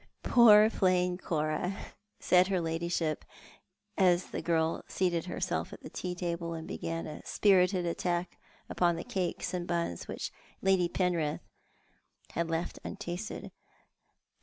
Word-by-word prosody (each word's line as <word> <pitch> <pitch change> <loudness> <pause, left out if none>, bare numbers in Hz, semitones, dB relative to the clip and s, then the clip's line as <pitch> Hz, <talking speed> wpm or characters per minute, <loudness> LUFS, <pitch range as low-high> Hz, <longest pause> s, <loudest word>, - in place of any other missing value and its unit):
" - - -42
Poor 215 -3 +7
plain 180 -3 +2
Cora," 165 +2 -2 0.4
said 180 0 +4
her 190 -2 +1
ladyship, 165 -1 -1 0.7
as 180 -1 +3
the - - -3
girl 165 -1 0
seated 175 -3 0
her 180 - -5
self - - -2
at - - -10
the - - -9
tea 180 -1 -4
table 170 -1 -3
and 160 0 -7
began 165 0 -4
a 155 - -8
spirited 185 -2 +3
attack 175 +1 -2 0.3
upon 175 -1 +2
the 165 - -5
cakes 185 -1 -2
and 175 -1 -3
buns 170 - -2
which - - -4 0.3
Lady 190 -2 +3
Penrith 170 -6 0 0.9
had 170 0 -2
left 165 +1 -2
untasted. 205 0 -5
175 Hz, 135 wpm, -31 LUFS, 165-185 Hz, 0.9 s, Poor